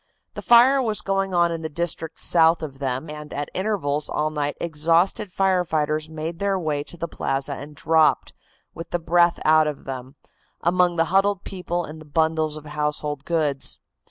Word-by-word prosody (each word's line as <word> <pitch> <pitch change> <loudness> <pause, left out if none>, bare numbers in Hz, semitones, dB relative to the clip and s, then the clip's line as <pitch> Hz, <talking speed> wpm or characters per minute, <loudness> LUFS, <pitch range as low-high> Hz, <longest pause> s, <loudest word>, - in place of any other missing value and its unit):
The - - -6
fire 250 +3 +6
was 220 -4 0
going 195 0 -1
on 170 -1 +3
in 165 -1 -4
the 160 - -4
district 165 0 -3
south 165 -1 +3
of 135 -3 -7
them, 135 +2 -2
and 150 0 -8
at 145 0 -4
intervals 170 -8 -1
all 155 +1 -1
night 145 -1 -2
exhausted 170 +5 +1
fire 190 -1 +2
fighters 155 -1 -1
made 160 +2 -5
their 200 -1 +1
way 150 -5 -2
to 175 - -10
the 170 - -3
plaza 135 -3 -2
and 145 +2 -9
dropped, 160 0 +2 0.4
with 165 0 -8
the - - 0
breath 170 +1 +2
out 155 0 +5
of 150 -2 -5
them, 130 0 -7 0.5
among 175 0 +2
the 165 -1 +2
huddled 195 0 +2
people 175 -2 -3
and 155 +1 -10
the - - -12
bundles 160 0 0
of 155 - -11
household 150 -1 -3
goods. 150 -5 -1
160 Hz, 185 wpm, -23 LUFS, 150-175 Hz, 0.5 s, fire